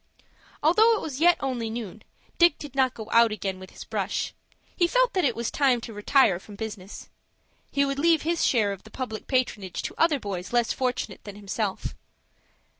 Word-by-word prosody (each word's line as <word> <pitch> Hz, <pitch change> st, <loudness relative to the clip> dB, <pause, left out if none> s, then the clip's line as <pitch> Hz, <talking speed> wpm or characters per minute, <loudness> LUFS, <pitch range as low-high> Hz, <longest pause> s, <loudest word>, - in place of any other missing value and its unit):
Although 435 Hz, +9 st, +5 dB
it -, -, -3 dB
was 285 Hz, -4 st, -5 dB
yet 350 Hz, +1 st, +6 dB
only 250 Hz, -4 st, -2 dB
noon, 220 Hz, -2 st, -6 dB, 0.4 s
Dick 345 Hz, -3 st, +6 dB
did 290 Hz, -3 st, -9 dB
not 260 Hz, -2 st, +2 dB
go 220 Hz, -2 st, -7 dB
out 230 Hz, -1 st, +5 dB
again 195 Hz, -3 st, -3 dB
with 185 Hz, 0 st, -10 dB
his -, -, -10 dB
brush. -, -, -2 dB, 0.4 s
He 345 Hz, -, +3 dB
felt -, -, +2 dB
that 370 Hz, -, +1 dB
it 250 Hz, -5 st, +2 dB
was 235 Hz, 0 st, -2 dB
time 265 Hz, -4 st, +3 dB
to 230 Hz, -, -8 dB
retire 205 Hz, -2 st, +3 dB
from 205 Hz, +2 st, -12 dB
business. 205 Hz, -3 st, -7 dB, 0.6 s
He 280 Hz, 0 st, +2 dB
would 275 Hz, 0 st, -2 dB
leave 325 Hz, 0 st, +3 dB
his 335 Hz, +1 st, 0 dB
share 215 Hz, -5 st, +3 dB
of 195 Hz, -, -6 dB
the -, -, -15 dB
public 245 Hz, -5 st, -6 dB
patronage 220 Hz, -8 st, -1 dB
to -, -, -4 dB
other 320 Hz, -4 st, +3 dB
boys 190 Hz, -5 st, -5 dB
less 240 Hz, -1 st, +2 dB
fortunate 255 Hz, -1 st, -3 dB
than 205 Hz, -1 st, -9 dB
himself. 205 Hz, 0 st, -3 dB
245 Hz, 190 wpm, -26 LUFS, 210-290 Hz, 0.6 s, yet